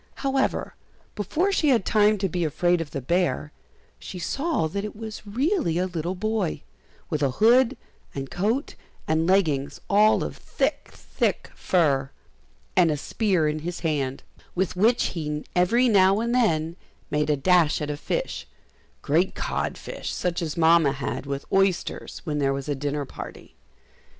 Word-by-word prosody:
However, 270 0 0 0.4
before 310 - 0
she 310 -6 +2
had 235 -7 +3
time 215 -1 +4
to 195 0 0
be 175 0 -2
afraid 175 +3 +1
of 160 - -5
the 140 - -4
bear, 150 0 0 0.5
she 185 - -8
saw 275 - -1
that 200 +6 -3
it 210 - -6
was 220 -1 -8
really 260 - 0
a 180 - +1
little 175 0 -3
boy, 205 -6 -2 0.5
with 150 -2 -1
a 140 - +3
hood 245 +4 +5 0.4
and 135 -1 -5
coat 220 - -1 0.3
and 160 +1 +1
leggings 160 -8 +1
all 210 +2 +5
of - - -5
thick, - - -2
thick - - -2
fur, 140 -7 +1 0.7
and 180 -3 +5
a 150 - 0
spear 185 0 0
in 150 +1 -1
his 175 +3 -5
hand, 140 -5 -1 0.3
with 180 -1 0
which 225 +6 +3
he 150 -3 -4
every 230 +8 +4
now 195 -2 +5
and 235 +1 -1
then 165 -9 +1 0.3
made 150 0 +1
a 150 - +2
dash 165 +1 +3
at 150 -1 -3
a - - -3
fish, - - -3 0.6
great - - +1
cod - - -2
fish, - - -6
such 175 -1 -2
as 160 -2 -3
Mamma 165 -3 +5
had, 135 -1 -4
with 140 0 -4
oysters, 195 -2 0
when 150 -3 -2
there 135 -1 +2
was 140 0 -5
a 145 - 0
dinner 145 +1 -2
party. - - -10
175 Hz, 165 wpm, -25 LUFS, 150-210 Hz, 0.7 s, hood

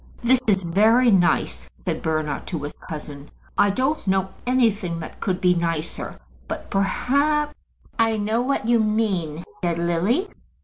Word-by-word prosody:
"This 255 +2 +4
is 195 -3 +3
very 220 +8 +4
nice," 180 -3 +2
said - - -4
Bernard 155 -2 -2
to 165 -6 -4
his 145 - -5 0.2
cousin. 150 -2 -7 0.3
"I 205 - +4
don't 260 +5 -1
know 190 0 +1 0.2
anything 215 -9 +1
that 160 - -8
could 185 -1 -1
be 180 -1 +4
nicer; 165 -2 -3 0.3
but - - -6
perhaps 285 +9 +1 0.3
" - - -35
"I 225 -1 +3
know 215 +3 0
what 255 -3 -1
you 235 -1 +4
mean," 200 -8 0 0.2
said 170 -2 -1
Lily. 175 - +1
195 Hz, 150 wpm, -23 LUFS, 170-235 Hz, 0.3 s, This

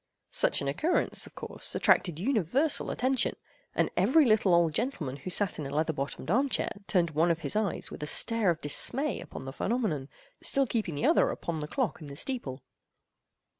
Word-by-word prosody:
Such - - +3
an - - -3
occurrence, 310 - 0
of - - -17
course, - - -6
attracted 170 -4 +2
universal 260 - +1
attention, 255 0 +1 0.4
and - - +1
every 310 +2 +4
little 215 -6 +4
old 170 -2 +3
gentleman 150 - -2
who 145 - -7
sat 190 -1 +1
in 145 - -4
a - - -7
leather 155 +3 0
bottomed 140 +3 -4
arm 265 +6 +2
chair - - -1 0.2
turned 175 -4 +1
one 160 +3 +2
of 165 0 0
his - - 0
eyes 215 -3 -1
with - - -8
a 150 - -3
stare 230 +3 +2
of 170 -1 -1
dismay 265 - +1
upon - - -9
the 135 - -6
phenomenon, 185 - -2 0.3
still 275 0 +3
keeping 215 - -2
the 145 - -1
other - - +4
upon 165 -2 -4
the 150 - -4
clock 250 - -2
in 150 - -8
the 140 - -9
steeple. 145 - -4
175 Hz, 195 wpm, -29 LUFS, 150-245 Hz, 0.4 s, every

